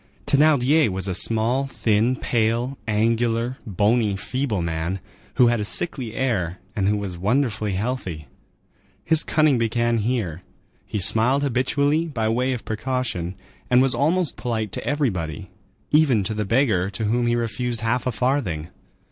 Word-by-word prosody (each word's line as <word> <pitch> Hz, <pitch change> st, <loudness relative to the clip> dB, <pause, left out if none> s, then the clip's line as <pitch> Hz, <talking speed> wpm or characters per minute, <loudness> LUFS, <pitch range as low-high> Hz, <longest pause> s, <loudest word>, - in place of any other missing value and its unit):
Thénardier 145 Hz, -1 st, +4 dB
was 95 Hz, 0 st, -3 dB
a 95 Hz, -, -1 dB
small, 115 Hz, +7 st, +2 dB
thin, 115 Hz, -1 st, +1 dB
pale, 120 Hz, +2 st, 0 dB
angular, 115 Hz, +3 st, +1 dB
bony, 105 Hz, +1 st, +2 dB
feeble 120 Hz, -3 st, -2 dB
man, 85 Hz, +3 st, -2 dB, 0.4 s
who 125 Hz, -, +5 dB
had 120 Hz, -1 st, +2 dB
a -, -, -1 dB
sickly 105 Hz, +5 st, -2 dB
air 95 Hz, -10 st, -1 dB, 0.2 s
and 100 Hz, -2 st, 0 dB
who 105 Hz, +1 st, +2 dB
was 95 Hz, -4 st, -5 dB
wonderfully 110 Hz, -1 st, 0 dB
healthy. 95 Hz, -, -3 dB, 0.8 s
His 160 Hz, -1 st, +3 dB
cunning 155 Hz, -5 st, +2 dB
began 115 Hz, +1 st, +1 dB
here; 105 Hz, -7 st, -2 dB, 0.5 s
he -, -, -3 dB
smiled 115 Hz, +8 st, +2 dB
habitually, 140 Hz, +4 st, +1 dB
by 115 Hz, -8 st, -1 dB
way 125 Hz, +3 st, +1 dB
of 120 Hz, -, -6 dB
precaution, 110 Hz, -6 st, -3 dB, 0.3 s
and 125 Hz, -, +5 dB
was 135 Hz, 0 st, +3 dB
almost 165 Hz, +1 st, +1 dB
polite 110 Hz, -4 st, -2 dB
to -, -, -4 dB
everybody, 95 Hz, -, -2 dB, 0.4 s
even 145 Hz, -9 st, +4 dB
to 110 Hz, -, -2 dB
the 105 Hz, 0 st, -2 dB
beggar 105 Hz, -5 st, +2 dB
to 100 Hz, +3 st, -5 dB
whom 120 Hz, +3 st, +1 dB
he 120 Hz, -, +2 dB
refused 120 Hz, 0 st, -2 dB
half 120 Hz, +2 st, 0 dB
a -, -, +1 dB
farthing. 115 Hz, -, -1 dB
115 Hz, 150 wpm, -23 LUFS, 105-130 Hz, 0.8 s, who